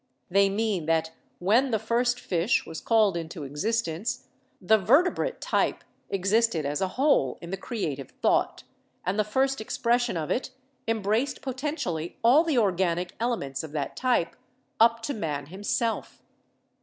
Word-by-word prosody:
They 195 +1 +4
mean 200 -5 -1
that 160 0 +1 0.3
when 225 +9 +3
the 225 - +2
first 240 +3 0
Fish 180 +5 +1
was 160 -1 -7
called 215 -5 +3
into 165 -1 -5
existence, 210 - -2 0.3
the 215 +3 +4
Vertebrate 345 - +2
type - - 0 0.3
existed 195 -3 +1
as 145 +1 -2
a 190 - +2
whole 265 - +3
in 170 - -9
the - - 0
creative 155 - -4
thought, - - +1 0.4
and 190 +4 0
the - - +4
first 265 +4 0
expression 235 -1 0
of 155 -2 -3
it 255 - -1 0.4
embraced 225 +4 0
poten 270 +3 -3
tially 165 - -3
all 260 +8 +6
the 320 -6 0
organic 180 -4 +1
elements 190 - -2
of 155 -2 -8
that 145 -3 -3
type, 245 -10 +1 0.4
up 230 0 +4
to 285 - -2
Man 150 - -3
himself. 205 +7 -3
210 Hz, 150 wpm, -27 LUFS, 170-240 Hz, 0.4 s, all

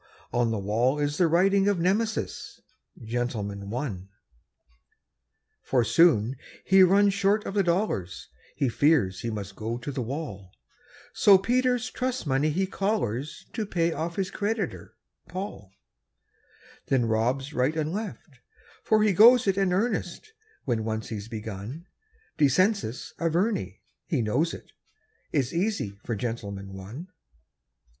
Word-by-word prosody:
on 120 -1 +2
the 110 - -1
wall 115 +8 +1
is 145 0 -1
the 175 - +5
writing 195 +4 +3
Of 200 -3 +2
Nemesis, 210 +6 -1 0.4
"Gentleman, 110 -4 -3
One". 105 -6 -4 1.5
For 125 -3 +1
soon 120 -1 +4 0.3
he 190 0 +6
runs 200 +2 +5
short 205 +1 +1
of - - -4
the 200 - +3
dollars, 170 - -1 0.3
He 135 - +1
fears 120 - +2
he 115 - -3
must 100 -3 -6
go 115 +3 -3
to 125 +4 -5
the 130 - -3
wall; 110 - -6 0.6
So 200 -2 +7
Peter's 250 +4 +1
trust 255 -2 -2
money 140 +2 +1
he 185 +6 0
collars 170 - -2
To 220 - -2
pay 170 -4 0
off 165 +1 -3
his 190 -2 -2
creditor, 215 +2 -3 0.3
Paul; 185 - -7 1.2
Then 130 -3 +2
robs 125 +6 0
right 130 +6 +1
and 155 +1 -1
left 195 - -6 0.4
for 215 -1 +3
he 210 -2 +3
goes 240 +6 +7
it 195 -2 +2
In 195 -2 +1
earnest 205 - -2 0.3
when 115 -4 0
once 110 0 -3
he's 105 -2 -5
begun. 110 - -7 0.5
Descensus 160 - +1
Averni 165 - -1 0.3
he 145 -10 0
knows 140 +10 +1
it; - - -10 0.6
It's 140 -2 0
easy 170 - -1
for 115 - -3
"Gentleman, 100 -4 -5
One". 110 - -9
150 Hz, 135 wpm, -27 LUFS, -, 1.5 s, So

